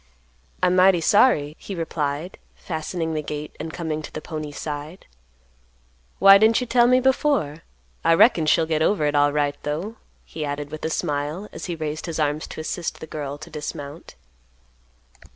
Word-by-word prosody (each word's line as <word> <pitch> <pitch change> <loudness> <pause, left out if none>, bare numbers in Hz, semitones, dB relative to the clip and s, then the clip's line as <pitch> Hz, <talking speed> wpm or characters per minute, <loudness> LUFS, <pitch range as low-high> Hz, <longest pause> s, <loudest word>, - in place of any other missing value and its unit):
"I'm 180 0 +4
mighty 185 -1 +5
sorry," 155 - +3
he 195 - -7
replied, 160 0 -3 0.2
fastening 160 0 -4
the 155 - -1
gate 150 0 -6
and 160 +1 -5
coming 160 -2 -3
to - - -9
the - - -5
pony's 155 -2 -6
side. 150 +3 -6 1.1
"Why 195 0 +8
didn't 220 +2 +4
you 250 - -2
tell 240 0 +4
me 255 +1 +5
before? 260 - +1 0.4
I 165 - +5
reckon 165 -5 +5
she'll 160 +1 +4
get 160 -1 -1
over 160 -1 +2
it 145 - +1
alright, 145 0 +1
though," 170 +10 -4 0.3
he 155 - -6
added 145 0 -4
with 155 - -7
a - - 0
smile, 150 +5 -2
as - - -7
he 175 - -3
raised 155 +1 -4
his 165 -1 -4
arms 150 0 0
to - - -8
assist 170 +2 -4
the - - -7
girl 145 -2 -5
to 155 - -11
dismount. 150 0 -7
155 Hz, 170 wpm, -23 LUFS, 150-180 Hz, 1.1 s, Why